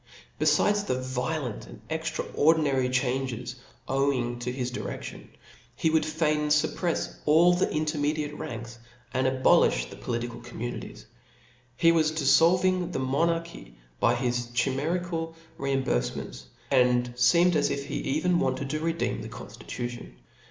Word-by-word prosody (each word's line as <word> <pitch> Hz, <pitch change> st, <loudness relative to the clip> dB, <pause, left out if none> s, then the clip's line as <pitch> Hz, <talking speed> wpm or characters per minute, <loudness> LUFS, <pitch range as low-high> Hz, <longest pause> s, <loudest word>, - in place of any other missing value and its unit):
Befides 205 Hz, 0 st, +3 dB
the 130 Hz, -, 0 dB
violent 130 Hz, 0 st, -3 dB
and -, -, -12 dB
extraordinary 145 Hz, -5 st, +1 dB
changes 125 Hz, -1 st, -1 dB, 0.3 s
owing 130 Hz, -3 st, 0 dB
to 120 Hz, +1 st, -3 dB
his 125 Hz, -1 st, -3 dB
direiftion, -, -, -6 dB, 0.5 s
he 160 Hz, +5 st, +1 dB
would 160 Hz, -1 st, +2 dB
fain 155 Hz, -1 st, +1 dB
fupprefs 150 Hz, +3 st, 0 dB
all 165 Hz, +4 st, +6 dB
the 175 Hz, -, +1 dB
intermediate 150 Hz, -1 st, -1 dB
ranks^ 115 Hz, -2 st, -7 dB, 0.4 s
and 130 Hz, 0 st, +1 dB
aboHfh 130 Hz, -, +3 dB
the -, -, -8 dB
political 120 Hz, 0 st, -4 dB
communities. 120 Hz, +2 st, -7 dB, 0.7 s
He 165 Hz, -1 st, +5 dB
was 160 Hz, -2 st, +3 dB
diflblving 170 Hz, +5 st, +3 dB
^ -, -, -8 dB
the -, -, -3 dB
monarchy 135 Hz, -, -1 dB, 0.2 s
by 120 Hz, -, +3 dB
his 120 Hz, -1 st, -1 dB
chimerical 165 Hz, +6 st, -1 dB, 0.2 s
reimburfements, 130 Hz, -, -2 dB, 0.3 s
and 125 Hz, -2 st, +3 dB
feemed 170 Hz, +9 st, +4 dB
as 145 Hz, -, +2 dB
if 140 Hz, -, -2 dB
^e -, -, -8 dB
even 160 Hz, +5 st, 0 dB
wanted 135 Hz, +1 st, -1 dB
to 155 Hz, -, -1 dB
redeem 165 Hz, +1 st, -1 dB
the -, -, -7 dB
con -, -, -9 dB
ilitution. 120 Hz, -1 st, -7 dB
140 Hz, 130 wpm, -27 LUFS, 125-160 Hz, 0.7 s, all